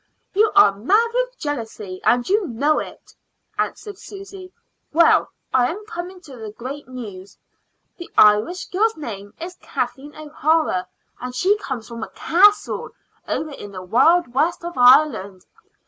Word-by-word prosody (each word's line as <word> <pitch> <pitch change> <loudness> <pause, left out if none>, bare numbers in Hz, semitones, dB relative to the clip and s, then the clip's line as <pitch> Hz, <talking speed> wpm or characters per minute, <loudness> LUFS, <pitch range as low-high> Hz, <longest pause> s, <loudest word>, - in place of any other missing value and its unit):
"You 425 +2 +3
are 405 - +7
mad 410 - +2
with - - -1
jealousy, 220 -9 -5
and 245 +1 +2
you 400 0 +1
know 280 +6 +1
it," - - -9 0.5
answered 410 -3 -3
Susy. 390 -2 -10 0.4
"Well, 335 +2 +4 0.2
I 250 -1 +3
am 415 +5 -6
coming 370 -4 -7
to 275 -7 -12
the 220 -2 -7
great 260 +7 -8
news. 205 -7 -9 0.6
The 345 - -9
Irish 215 +13 +4
girl's 440 +3 +1
name 205 -9 -8
is 355 +2 -8
Kathleen 290 +2 -4
O'Hara, 310 - 0 0.3
and 250 0 -6
she 385 +9 +3
comes 260 - -5
from 235 -1 -8
a - - -5
castle 405 +5 +2 0.4
over 310 - -2
in 205 -7 -9
the 185 -2 -8
wild 260 - +3
west 330 +6 0
of 345 - -5
Ireland. 245 -7 +4
295 Hz, 145 wpm, -21 LUFS, 230-370 Hz, 0.6 s, are